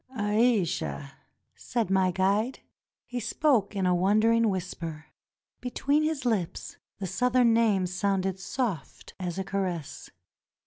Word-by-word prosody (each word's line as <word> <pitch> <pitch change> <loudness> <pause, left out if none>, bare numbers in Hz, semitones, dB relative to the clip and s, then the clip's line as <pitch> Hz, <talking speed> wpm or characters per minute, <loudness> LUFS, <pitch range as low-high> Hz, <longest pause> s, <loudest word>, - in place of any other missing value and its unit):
"Aisha!" 205 - +1 0.4
said 230 -6 -2
my 190 -1 +3
guide. 200 +7 0 0.4
He 245 - -4
spoke 230 -3 +1
in 195 -2 0
a 180 - +3
wondering 215 +5 +3
whisper. 165 -4 -5 0.5
Between 280 +4 0
his 310 -4 -1
lips 205 -8 -2 0.2
the 195 - -4
Southern 240 +5 +3
name 215 -5 +3
sounded 190 +1 -1
soft 190 - -4
as 180 -2 -4
a 190 - -1
caress. 185 -6 -4
195 Hz, 120 wpm, -28 LUFS, 185-230 Hz, 0.5 s, my